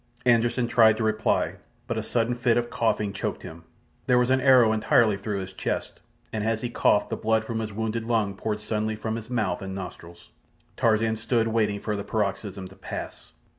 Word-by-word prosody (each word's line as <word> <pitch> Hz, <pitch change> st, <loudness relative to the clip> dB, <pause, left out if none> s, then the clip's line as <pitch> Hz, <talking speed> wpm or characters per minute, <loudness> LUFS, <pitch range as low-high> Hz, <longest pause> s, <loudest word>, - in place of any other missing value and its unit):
Anderssen 120 Hz, 0 st, +3 dB
tried 110 Hz, -2 st, +5 dB
to 110 Hz, -, -1 dB
reply, 110 Hz, 0 st, 0 dB, 0.3 s
but -, -, -3 dB
a -, -, -1 dB
sudden 115 Hz, 0 st, 0 dB
fit 120 Hz, -1 st, +2 dB
of 120 Hz, 0 st, -1 dB
coughing 105 Hz, -3 st, 0 dB
choked -, -, -4 dB
him. 80 Hz, +1 st, -10 dB, 0.4 s
There 125 Hz, -, +4 dB
was 125 Hz, +1 st, +3 dB
an 130 Hz, 0 st, +3 dB
arrow 125 Hz, -4 st, +6 dB
entirely 110 Hz, 0 st, +3 dB
through 100 Hz, 0 st, -3 dB
his 95 Hz, 0 st, -8 dB
chest, -, -, -3 dB, 0.3 s
and 110 Hz, -1 st, -2 dB
as 110 Hz, 0 st, 0 dB
he 120 Hz, -, -2 dB
coughed 105 Hz, -, +2 dB
the -, -, 0 dB
blood 110 Hz, 0 st, +1 dB
from 115 Hz, 0 st, -3 dB
his 110 Hz, -1 st, -4 dB
wounded 110 Hz, +2 st, -3 dB
lung 110 Hz, -4 st, +1 dB
poured 105 Hz, +1 st, -3 dB
suddenly 110 Hz, 0 st, -2 dB
from 110 Hz, +1 st, -3 dB
his 115 Hz, 0 st, -7 dB
mouth 105 Hz, -8 st, -1 dB
and 95 Hz, 0 st, -5 dB
nostrils. 85 Hz, -2 st, -9 dB, 0.5 s
Tarzan 110 Hz, 0 st, +2 dB
stood 115 Hz, 0 st, 0 dB
waiting 105 Hz, -2 st, +1 dB
for 105 Hz, +1 st, -2 dB
the 100 Hz, -, -4 dB
paroxysm 100 Hz, -2 st, -3 dB
to 95 Hz, -, -15 dB
pass. -, -, -8 dB
110 Hz, 200 wpm, -26 LUFS, 105-115 Hz, 0.5 s, arrow